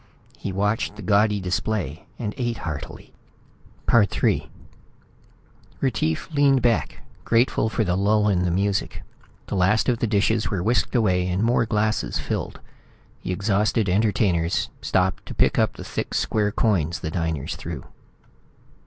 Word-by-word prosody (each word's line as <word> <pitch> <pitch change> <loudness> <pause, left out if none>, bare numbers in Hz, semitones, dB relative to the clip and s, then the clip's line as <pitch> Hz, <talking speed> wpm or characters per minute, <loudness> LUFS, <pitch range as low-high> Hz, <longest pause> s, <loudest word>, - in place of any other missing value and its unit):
He 100 - -5
watched 105 +3 -1
the 105 - -9
gaudy 105 0 +3
display 90 -3 -2
and 105 -3 -3
ate 120 -3 -2
heartily. 75 -4 -7 0.8
III 105 -5 +2 1.3
Retief 105 - -1
leaned 140 -3 +3
back, 120 -2 0 0.2
grateful 115 -1 +2
for 110 - 0
the 90 -3 0
lull 105 +2 +2
in 95 -4 +2
the 90 - +1
music. 100 +3 -1 0.4
The - - -6
last 95 +4 +2
of 120 -3 +1
the 115 - 0
dishes 110 +1 +1
were 95 -4 -2
whisked 120 +5 +1
away, 90 -6 +2
and 90 +3 0
more 115 0 +2
glasses 110 0 0
filled. - - -4 0.6
The - - -4
exhausted 105 +2 +1
entertainers 95 -4 +1
stopped 95 0 0
to - - -7
pick - - +2
up - - +2
the - - -9
thick - - -4
square 105 -2 +1
coins 90 -7 0
the 80 - -3
diners 80 -4 -2
threw. 80 -6 -6
105 Hz, 145 wpm, -23 LUFS, 90-110 Hz, 1.3 s, gaudy